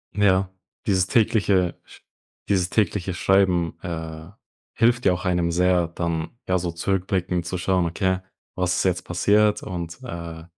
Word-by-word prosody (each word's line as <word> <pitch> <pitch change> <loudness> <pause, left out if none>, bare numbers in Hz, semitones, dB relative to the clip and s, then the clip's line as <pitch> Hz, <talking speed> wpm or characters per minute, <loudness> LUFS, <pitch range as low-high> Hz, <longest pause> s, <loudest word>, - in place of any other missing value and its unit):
Ja, 95 -2 +3 0.4
dieses 95 -3 +2
tägliche 100 -6 +2
Sch - - -17 0.5
dieses 95 -2 +2
tägliche 100 -3 0
Schreiben, 90 -2 +2
äh, 80 -2 -6 0.4
hilft 120 +2 +2
ja - - +6
auch 90 +2 -3
einem 90 -2 +1
sehr, 90 -1 +2
dann, 85 -2 -2 0.2
ja, 95 - +2
so 85 -1 -2
zurückblickend 90 0 -1
zu 90 +2 -3
schauen: 90 0 +1
„Okay, 95 +2 0 0.4
was 90 -1 0
ist - - +1
jetzt 90 -1 +1
passiert 105 +4 +2
und, 85 -3 -5
äh, 85 -7 -7
90 Hz, 145 wpm, -23 LUFS, 85-95 Hz, 0.5 s, ja